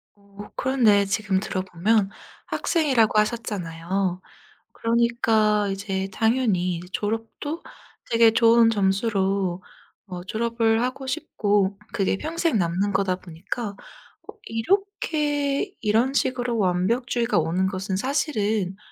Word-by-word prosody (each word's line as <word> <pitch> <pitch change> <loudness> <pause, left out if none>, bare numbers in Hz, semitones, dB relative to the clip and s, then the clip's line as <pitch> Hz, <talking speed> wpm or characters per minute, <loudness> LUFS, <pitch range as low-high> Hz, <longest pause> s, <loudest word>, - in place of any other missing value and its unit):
어 200 0 -13
그런데 230 -6 +3
지금 195 -1 0
들어 190 -1 -3
보면 195 +3 +1 0.4
학생이라고 260 -10 +2
하셨잖아요. 190 -4 -2 0.5
그러니까 230 -3 +2
이제 195 -1 -3
당연히 205 -7 +1
졸업도 225 +9 -3 0.5
되게 230 0 +6
좋은 230 0 +5
점수로 195 -3 0 0.4
어 180 -2 -7
졸업을 225 +2 +1
하고 260 +2 -3
싶고 205 -9 0
그게 195 -2 +1
평생 325 - 0
남는 185 +3 0
거다 190 -2 +1
보니까 185 +6 -6 0.6
어 - - -9
이렇게 300 - -1
이런 225 +5 +2
식으로 245 -3 0
완벽주의가 225 +5 +1
오는 165 +4 +1
것은 190 0 -2
사실은 215 - -1
215 Hz, 250 characters per minute, -24 LUFS, 190-235 Hz, 0.6 s, 되게